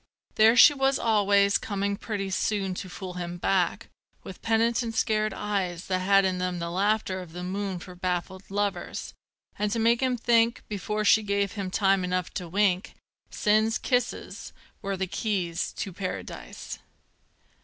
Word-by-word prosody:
There 220 +2 +5
she 290 - +9
was 270 -1 +2
always 200 -2 +3
coming 200 -1 -2
pretty 200 -2 -4
soon 195 -1 0
To 185 +1 -6
fool 185 0 -7
him 175 -1 -5
back, 180 0 0 0.4
with 190 - -10
penitent 225 +1 +1
scared 215 -1 +1
eyes 195 -4 -2
That 185 -1 0
had 195 +1 +4
in 185 -1 0
them 180 -1 -2
the 170 0 -4
laughter 195 0 0
of 170 -3 -11
the 180 +1 -6
moon 195 +1 -3
For 180 +1 -10
baffled 180 +1 -4
lovers, 205 0 -3 0.5
and 210 0 0
to 230 - 0
make 230 +2 +3
him 255 -1 +1
think 230 0 +2
Before 210 +1 -3
she 220 +1 +6
gave 200 -1 0
him 200 -4 -4
time 195 0 +2
enough 180 0 -2
to 180 - -4
wink 190 0 +1 0.3
Sin's 215 +2 +2
kisses 250 -2 -2 0.3
were 195 -2 -3
the 190 - -1
keys 185 -3 -2
to 190 - -5
Paradise. 185 0 -6
200 Hz, 160 wpm, -27 LUFS, 185-215 Hz, 0.5 s, she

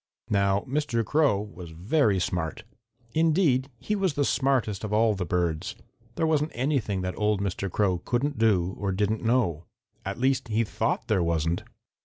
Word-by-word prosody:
"Now 100 -1 +2
Mr. 130 -4 -1
Crow 145 -6 +3
was 100 -4 -8
very 100 - +1
smart. 90 +3 -2 0.5
Indeed, 155 -5 +2
he 210 - -2
was 190 -7 0
the 145 - +1
smartest 130 -9 +1
of 105 - -4
all 110 +1 +3
the 95 -3 -3
birds. 85 -2 -1 0.4
There 160 - +1
wasn't 155 -1 +1
anything 125 -7 0
that 90 0 -2
old 105 -1 +2
Mr. 100 0 -2
Crow 95 -1 +1
couldn't 135 +8 -1
do 95 -5 +2
or 100 -1 -1
didn't 105 +3 0
know. 110 -9 +1 0.4
At 100 +1 -4
least 130 +1 +1
he 115 +1 +1
thought 115 +2 -2
there 105 -5 +2
wasn't. 85 0 0
105 Hz, 165 wpm, -27 LUFS, 95-135 Hz, 0.5 s, Crow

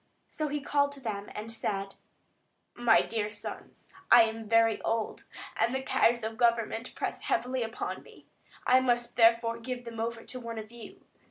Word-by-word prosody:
So 310 - -3
he 295 0 -3
called 285 0 +1
them 275 -2 -8
to 230 - -2 0.2
him, - - -12
and 215 +2 -6
said: 195 -3 -3 0.8
"My 240 -2 +4
dear 220 -2 -2
sons, 210 - -9 0.2
I 235 - +9
am 225 -1 -4
very 225 -1 +4
old, 225 -1 -2 0.3
and 240 - +1
the 265 - -2
cares 240 -2 +2
of 220 0 -4
government 230 0 +1
press - - -3
heavily 260 -8 -1
upon 225 0 -4
me. - - -17 0.4
I 255 +1 +6
must 240 -2 0
therefore 230 0 +4
give 245 +1 -5
them 230 -1 -7
over 230 0 -3
to 255 - -8
one 230 -2 -6
of 215 0 -7
you. 235 -3 -12
230 Hz, 180 wpm, -29 LUFS, 225-250 Hz, 0.8 s, I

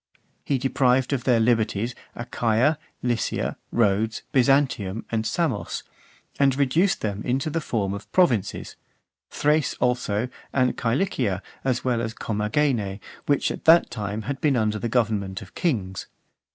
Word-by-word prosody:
He 140 - 0
deprived 130 0 +2
of 130 -3 -2
their 120 -3 +4
liberties, 115 0 +1 0.2
Achaia, 120 +5 +1 0.2
Lycia, 120 -2 -1 0.2
Rhodes, 110 0 +1
Byzantium, 130 -7 +2
and 110 -1 0
Samos; 130 -4 -1 0.6
and 135 -2 +4
reduced 150 +8 +2
them 105 -1 -2
into 135 +6 -1
the 165 - -1
form 100 -9 -1
of 100 - -8
provinces; 130 - +1 0.5
Thrace, 150 +1 +1
also, 120 -2 0 0.2
and 130 -2 +2
Cilicia, 115 - 0 0.2
as 130 -2 0
well 120 -2 +1
as 115 -1 -4
Comagene, 105 -1 0 0.3
which 145 -1 +2
until - - -6
that 165 +1 +6
time 105 +1 -4
had 135 +4 -4
been 145 -3 +3
under 110 -2 +1
the 120 - -2
government 105 -5 0
of 90 - -16
kings. 100 - -2
120 Hz, 140 wpm, -24 LUFS, 105-135 Hz, 0.6 s, that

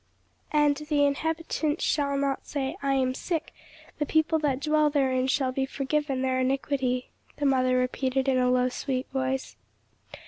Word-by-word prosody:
"'And 295 -1 +3
the 300 -1 +1
inhabitant 315 +1 -1
shall 280 -2 +1
not 275 -1 -1
say, 275 +1 -2
I 275 -1 +1
am 260 -1 +1
sick; 325 +3 -3 0.5
the 295 - +1
people 315 +1 +2
that 280 -4 0
dwell 305 +1 +2
therein 260 -3 +1
shall 265 -1 +1
be 265 +1 -1
forgiven 275 -1 -1
their 260 0 +1
iniquity,'" 260 -1 -1 0.3
the 290 - -1
mother 255 -2 +3
repeated 260 +1 0
in 260 -1 +3
a 250 0 +3
low 250 0 +3
sweet 260 +1 -3
voice. 265 0 -2
275 Hz, 160 wpm, -27 LUFS, 260-295 Hz, 0.5 s, And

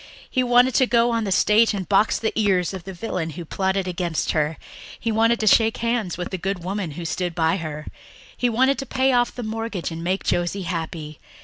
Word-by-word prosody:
He 255 - 0
wanted 245 +1 +4
to 260 +3 +3
go 235 0 +3
on 230 -1 0
the 195 - -2
stage 210 +4 +4
and 190 -3 -4
box 205 +2 +3
the 220 - -2
ears 195 -4 +1
of 185 -3 -7
the 195 - -6
villain 180 -4 -3
who 175 - -6
plotted 190 +2 -1
against 175 -4 -1
her; 155 0 0 0.4
he 230 - -1
wanted 230 +2 +3
to - - 0
shake 225 +1 +4
hands 230 -7 -1
with 180 - -5
the 190 - -3
good 190 0 -3
woman 185 -3 -3
who 170 +3 -7
stood 175 +2 -2
by 165 +2 +2
her; 155 -3 -6 0.5
he 245 - +1
wanted 260 +4 +2
to 270 - -5
pay 265 0 +2
off 245 -1 +2
the 245 - -5
mortgage 220 -5 -4
and 165 0 -6
make 185 +3 -1
Josie 175 +3 -1
happy. 160 -3 -5
195 Hz, 220 wpm, -23 LUFS, 175-230 Hz, 0.5 s, wanted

